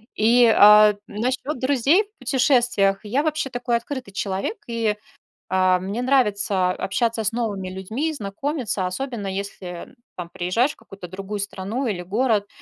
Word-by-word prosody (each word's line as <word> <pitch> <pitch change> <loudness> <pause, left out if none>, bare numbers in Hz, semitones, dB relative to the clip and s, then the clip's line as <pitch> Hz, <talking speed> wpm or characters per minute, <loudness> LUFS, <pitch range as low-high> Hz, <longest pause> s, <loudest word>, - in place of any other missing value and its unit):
И, 235 +3 +5
а 210 0 +7
насчёт 255 +7 -3
друзей 280 - +3
в 415 +1 -37
путешествиях. 245 -7 +2
Я 255 +8 0
вообще 310 -3 -1
такой 245 -1 -1
открытый 255 -2 -7
человек, 200 - -3
и, 225 -3 -1 0.5
а, 185 -1 +3
мне 200 +6 -4
нравится 205 -8 +2
общаться 225 +4 -1
с 205 - +1
новыми 205 -6 -3
людьми, 220 +12 -3
знакомиться, 215 - -3
особенно 220 +2 -4
если 190 -2 -6 0.2
там 175 -2 -7
приезжаешь 225 +13 0
в - - -20
какую-то 195 -2 -11
другую 195 +3 -6
страну 200 +6 -3
или 190 -6 -2
город, 210 +2 0
215 Hz, 145 wpm, -22 LUFS, 195-255 Hz, 0.5 s, а